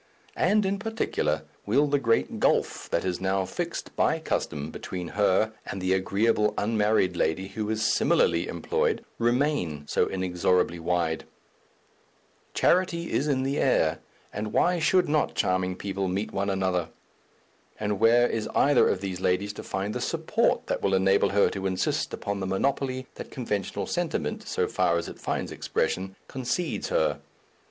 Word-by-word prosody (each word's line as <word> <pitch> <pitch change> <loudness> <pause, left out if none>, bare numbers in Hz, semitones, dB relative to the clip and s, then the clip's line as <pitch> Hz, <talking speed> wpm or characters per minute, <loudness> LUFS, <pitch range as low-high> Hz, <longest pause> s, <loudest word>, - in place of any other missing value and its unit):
and 210 -1 +3
in 195 +1 0
particular, 205 - -1 0.2
will 135 +8 +4
the 145 0 +1
great 115 -3 +1
gulf - - +1
that - - 0
is 90 -1 -2
now 95 0 +1
fixed - - -5
by - - +2
custom 75 +1 -3
between 90 -2 -6
her 105 +2 +2
and 100 - -4
the 95 0 +1
agreeable 105 +3 +1
unmarried 105 -3 +2
lady 85 +4 0
who 105 0 -4
is 110 0 0
similarly 85 +1 +2
employed 85 - -1
remain 120 - 0
so - - +1
inexorably 90 -1 0
wide? 85 -1 -1 1.3
Charity 170 -2 +2
is 145 - +1
in 130 -3 +1
the 135 +2 -1
air, 80 - +2 0.3
and 105 +1 -4
why 180 0 +2
should 180 +2 +3
not 150 0 +1
charming 90 0 +1
people 95 0 -3
meet 95 +4 -2
one 100 +1 -1
another? 95 -3 0 0.9
And 105 -1 -1
where 120 +2 +5
is 110 -2 -3
either 145 -2 +5
of 95 - -1
these 95 -2 -4
ladies 95 +3 0
to - - -7
find 100 +2 -3
the - - -3
support - - +1
that - - -2
will 95 - +2
enable 95 +1 +3
her 100 0 +4
to 95 0 -2
insist 95 -1 -1
upon 100 0 -3
the 95 - -3
monopoly 130 +6 -1
that - - -8
conventional 105 -7 -3
sentiment, - - -2
so - - 0
far 85 - +1
as 85 - -3
it - - -9
finds - - -3
expression, 95 +1 -2
concedes 130 +7 -2
her? - - +1
100 Hz, 160 wpm, -27 LUFS, 95-125 Hz, 1.3 s, where